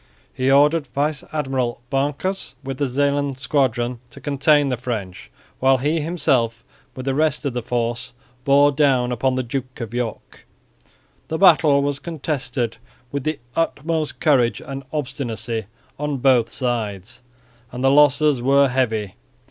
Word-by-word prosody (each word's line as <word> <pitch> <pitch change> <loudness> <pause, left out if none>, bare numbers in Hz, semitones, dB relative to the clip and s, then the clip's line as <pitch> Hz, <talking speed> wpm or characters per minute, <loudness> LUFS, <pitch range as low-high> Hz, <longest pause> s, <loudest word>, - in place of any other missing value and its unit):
He 130 +1 0
ordered 145 +2 +4
Vice 145 +2 -1
Admiral 135 -6 -1
Banckers 145 +6 -2
with 135 -1 -5
the 140 - +1
Zeeland 140 +1 0
squadron 125 -3 0
to - - -12
contain 145 0 +2
the 125 - -1
French, 110 -7 -5 0.3
while 135 0 +4
he 150 +6 0
himself 135 -8 0 0.3
with 130 - -7
the 135 - 0
rest 155 +1 +1
of 140 - -1
his 120 -1 -3
force 120 +1 -2 0.3
bore 140 +1 +5
down 135 -4 +2
upon 130 +2 0
the 130 - -1
Duke 130 +1 -5
of 115 -2 -6
York. 120 -2 -5 0.8
The 160 - -2
battle 155 -6 +5
was 140 -1 -1
contested 140 -7 -3 0.3
with 140 -2 -3
the 155 -1 -1 0.2
utmost 160 -1 -1
courage 130 -6 +3
and 135 0 -7
obstinacy 120 -6 -3 0.3
on 150 -1 -2
both 125 -3 +3
sides 115 -4 -3 0.5
and 125 +1 -5
the 135 - +5
losses 145 -1 +4
were 140 +2 +4
heavy. 110 -6 -1
135 Hz, 145 wpm, -21 LUFS, 125-145 Hz, 0.8 s, bore